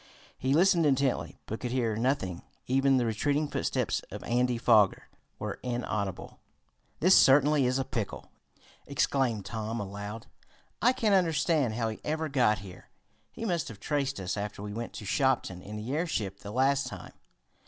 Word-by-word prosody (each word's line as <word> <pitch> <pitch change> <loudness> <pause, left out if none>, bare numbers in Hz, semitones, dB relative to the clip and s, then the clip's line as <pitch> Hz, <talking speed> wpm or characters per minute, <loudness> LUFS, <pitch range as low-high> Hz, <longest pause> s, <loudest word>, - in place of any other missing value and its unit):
He 130 +2 0
listened 175 0 +4
intently, 135 -2 0
but 110 - -5
could 125 - -3
hear 120 -3 0
nothing. 110 -7 -1 0.2
Even 135 +1 +3
the 125 - +2
retreating 145 +7 0
footsteps - - -1
of - - -8
Andy 125 0 +1
Foger 110 -4 +3 0.3
were - - -5
inaudible. 110 -6 -3 0.6
"This 185 +4 +6
certainly 140 0 +5
is 130 +1 +1
a 135 - -1
pickle!" 115 -6 -5 0.6
exclaimed 130 -6 0
Tom 110 0 -4
aloud. 105 +2 -6 0.6
"I 245 - +5
can't 230 -5 +1
understand 160 - +2
how 115 -1 0
he 110 - -6
ever 155 +1 -2
got 125 -6 +3
here. 90 -2 -12 0.4
He 230 - -6
must 175 -7 -1
have 110 -4 -9
traced 140 -5 -1
us 95 +1 -3
after 100 0 -5
we 105 0 -5
went 115 +2 -5
to 105 - -8
Shopton 120 -6 0
in 105 +3 -8
the 110 +5 -4
airship 110 - -2
the 100 - -9
last 135 +4 +2
time. - - -9
125 Hz, 165 wpm, -29 LUFS, 105-140 Hz, 0.6 s, This